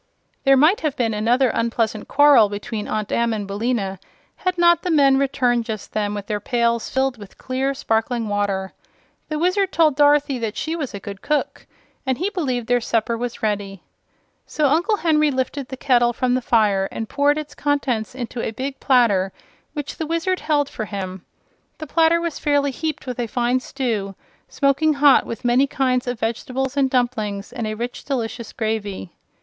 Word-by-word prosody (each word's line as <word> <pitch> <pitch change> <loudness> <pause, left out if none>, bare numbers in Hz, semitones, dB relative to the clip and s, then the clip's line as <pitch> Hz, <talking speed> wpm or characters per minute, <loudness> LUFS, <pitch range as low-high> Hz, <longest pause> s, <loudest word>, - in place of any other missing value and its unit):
There 270 0 +6
might 310 +9 +5
have 305 -4 -1
been 230 -3 0
another 240 +5 +2
unpleasant 230 -2 -1
quarrel 280 -7 +6
between 210 +1 -5
Aunt 215 -1 -3
Em 235 -1 +1
and 210 -2 -3
Billina 200 -1 -2 0.4
had 365 -1 -1
not 345 -1 +5
the 360 - -3
men 275 -4 +4
returned 250 -3 +1
just 215 -3 -6
then 210 -1 -1
with 205 -1 -5
their 210 0 -2
pails 235 +1 0
filled 265 -2 0
with 205 -2 -12
clear, 265 +2 -2
sparkling 225 -1 -1
water. 200 -2 -1 0.6
The 305 - -2
Wizard 365 +4 +1
told 310 -4 +3
Dorothy 290 -2 +3
that 225 -2 -3
she 320 +1 -2
was 285 -10 -4
a - - -5
good 200 0 -8
cook 300 -1 -2 0.4
and 260 -2 -1
he 375 +5 -1
believed 260 - -2
their 245 +1 +2
supper 230 0 0
was 240 0 -5
ready. 200 -3 -2 0.6
So 300 -3 +1
Uncle 350 +9 +2
Henry 305 -4 +3
lifted 265 0 -2
the 265 - -7
kettle 240 -3 +3
from 250 +1 0
the 255 - +1
fire 205 -5 +2
and 225 - -4
poured 285 +3 +2
its 305 -1 -6
contents 260 -6 -1
into 245 -1 -5
a - - -2
big 265 +5 -5
platter 215 -8 +3 0.4
which 295 -2 -5
the 320 - -3
Wizard 335 +3 0
held 290 -2 +1
for 220 - -5
him. 190 -3 -6 0.5
The 310 - -6
platter 330 +2 +3
was 335 -2 -3
fairly 285 -1 +1
heaped 305 +2 -4
with 250 -2 -5
a 240 - -1
fine 245 +3 +1
stew, 225 -8 -3 0.3
smoking 285 +3 +2
hot, 285 -1 +5
with 230 +1 -6
many 250 +3 +4
kinds 255 -2 0
of 245 -2 -3
vegetables 255 +4 -2
and 275 -2 +2
dumplings 220 -6 -1
and 230 - -3
a 215 - -3
rich, 240 +3 -5
delicious 240 -3 -4
gravy. 215 -6 -3
250 Hz, 185 wpm, -21 LUFS, 220-285 Hz, 0.6 s, There